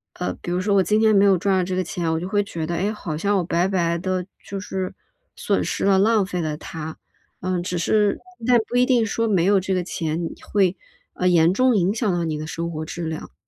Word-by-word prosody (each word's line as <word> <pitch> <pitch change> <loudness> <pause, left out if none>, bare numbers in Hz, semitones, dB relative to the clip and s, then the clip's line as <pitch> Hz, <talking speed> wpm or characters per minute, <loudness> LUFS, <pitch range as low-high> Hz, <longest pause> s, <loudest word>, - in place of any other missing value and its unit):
呃， 180 - -3
比 175 - -4
如 180 - 0
说 200 +2 +1
我 195 - +5
今 215 +3 +2
天 220 -1 +4
没 200 - +5
有 195 -2 +5
赚 190 +2 +1
到 185 - +2
这 185 +1 -3
个 185 - +1
钱， 170 -2 -2
我 160 - 0
就 180 - -4
会 205 +1 +1
觉 165 -5 -5
得， 170 - -2
哎， 195 +5 0
好 175 -8 -5
像 200 +4 +1
我 180 - +1
白 175 +2 +1
白 170 -3 +1
地 185 +1 -2 0.2
就 195 - -5
是 190 -1 -4 0.4
损 - - 0
失 - - -2
了、 195 -1 +4
浪 210 +1 +3
费 180 -2 -3
了 155 -2 -2
它。 160 0 -7 0.4
呃， 185 0 -1
只 180 0 -3
是 205 +4 +2 0.3
但 250 -1 +6
不 245 - 0
一 250 - +5
定 245 -3 +3
说 230 +1 -1
没 190 -6 +2
有 200 +1 +4
这 190 +1 -2
个 180 -1 0
钱， 165 -1 -3
你 165 - -2 0.2
会， 195 -3 +3 0.3
呃， 180 - -1
严 170 -1 +4
重 255 +3 +3
影 190 0 +2
响 220 -1 -1
到 175 -2 0
你 155 -2 -2
的 155 - -5
生 170 +1 -4
活 155 -1 -4
质 170 +2 -6
量。 160 - -6
185 Hz, 275 characters per minute, -22 LUFS, 170-200 Hz, 0.4 s, 但